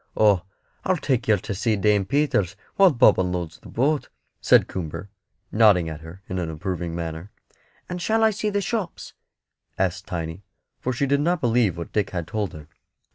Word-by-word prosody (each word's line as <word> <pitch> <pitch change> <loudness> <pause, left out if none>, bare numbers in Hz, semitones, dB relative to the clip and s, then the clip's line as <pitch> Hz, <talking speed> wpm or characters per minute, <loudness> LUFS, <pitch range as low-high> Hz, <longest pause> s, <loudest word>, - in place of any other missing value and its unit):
"Oh, 105 -4 +5 0.4
I'll 185 -1 +1
take 130 -6 0
yer 110 -2 +5
to 100 - -5
see 110 +3 +1
Dame 105 -1 +2
Peters 105 - +1 0.2
while 195 -1 +7
Bob 125 -7 +5
unloads 90 -3 -2
the - - -13
boat," 145 +5 0 0.3
said - - +5
Coomber, 90 +2 -5 0.4
nodding 105 -7 +5
at 80 -1 -7
her 85 +4 -11
in 95 - -3
an 85 -2 -2
approving 85 0 -4
manner. 85 +2 -5 0.6
"And 180 0 -5
shall 225 +4 +2
I 220 - +5
see 210 +1 -2
the 205 0 0
shops?" 200 -4 -4 0.6
asked 95 0 -1
Tiny; 85 0 -5 0.4
for 130 - -2
she 130 +3 0
did 140 +1 +2
not 175 +3 +1
believe 115 - +2
what 85 - -6
Dick 105 -3 +1
had 85 -3 -3
told 105 +4 -3
her. 75 -1 -10
100 Hz, 185 wpm, -24 LUFS, 85-140 Hz, 0.6 s, while